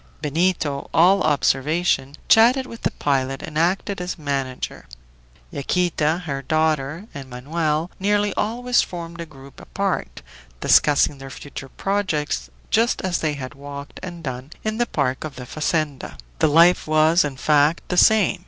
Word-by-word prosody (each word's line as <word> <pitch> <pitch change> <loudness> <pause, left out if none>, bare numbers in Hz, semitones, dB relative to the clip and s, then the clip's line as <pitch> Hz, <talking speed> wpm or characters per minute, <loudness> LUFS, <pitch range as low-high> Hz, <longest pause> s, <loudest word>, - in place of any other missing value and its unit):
Benito, 150 -2 -1
all 185 +4 +5
observation, 145 0 +1
chatted 245 +4 +5
with 230 -3 -10
the - - +1
pilot 135 -1 -1
and 150 - -8
acted 180 +4 0
as 180 +1 -4
manager. 135 - -4 0.6
Yaquita, 170 +2 0
her 140 -3 -3
daughter, 155 +3 0
and 135 -2 -8
Manoel, 155 +6 -2
nearly 205 +1 +1
always 245 +3 +1
formed 170 -1 -7
a 165 - -7
group 135 -3 -15
apart, - - -3 0.4
discussing 145 - +4
their 135 0 -9
future 135 0 -9
projects 150 - -2 0.2
just 230 +2 +2
as 185 -2 0
they 155 -2 0
had 135 -1 -7
walked 140 0 -9
and 175 -2 -8
done 130 0 -5
in 215 +1 -2
the 240 - +1
park 130 -3 -1
of 155 -2 -6
the 125 - -8
fazenda. 155 0 -2 0.2
The - - +4
life 170 +4 +5
was, 155 +3 +4
in 140 -3 -4
fact, 150 +3 +2
the 180 - 0
same. 215 -1 +4
155 Hz, 150 wpm, -22 LUFS, 140-180 Hz, 0.6 s, all